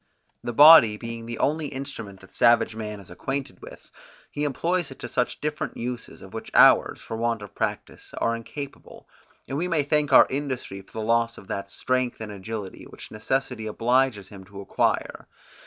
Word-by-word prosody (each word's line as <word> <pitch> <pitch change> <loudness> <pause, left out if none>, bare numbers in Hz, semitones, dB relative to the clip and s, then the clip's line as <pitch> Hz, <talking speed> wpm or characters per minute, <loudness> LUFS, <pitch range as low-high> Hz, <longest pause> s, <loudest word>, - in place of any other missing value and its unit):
The 120 - -3
body 130 -5 +8
being 115 0 -7
the 120 -1 -5
only 155 +1 0
instrument 130 -8 -7
that 95 - -17
savage 115 -1 +3
man 105 -2 -6
is 95 -3 -14
acquainted 135 +9 -5
with, - - -13 0.4
he 150 0 -2
employs 170 +4 -1
it 135 - -11
to 125 +1 -2
different 150 0 -3
uses, 120 0 -6
of - - -13
which - - -7
ours, - - +6
for - - -7
want 115 -1 -1
of 100 - -11
practice, - - -4
are 115 - 0
incapable; 140 +5 -9 0.4
and 135 +3 -3
we 175 - -1
may 165 -4 +1
thank 145 0 0
our - - +8
industry 130 -8 -4
for 95 - -24
the 110 -1 -4
loss 115 0 +1
of 95 - -13
that 100 0 -4
strength 130 +2 -1
and 110 -1 -6
agility, 100 0 -7
which - - -12
necessity 125 +1 -2
obliges 115 -2 +1
him 100 -2 -11
to 100 +1 -11
acquire. 100 - -1
115 Hz, 180 wpm, -25 LUFS, 110-135 Hz, 0.4 s, body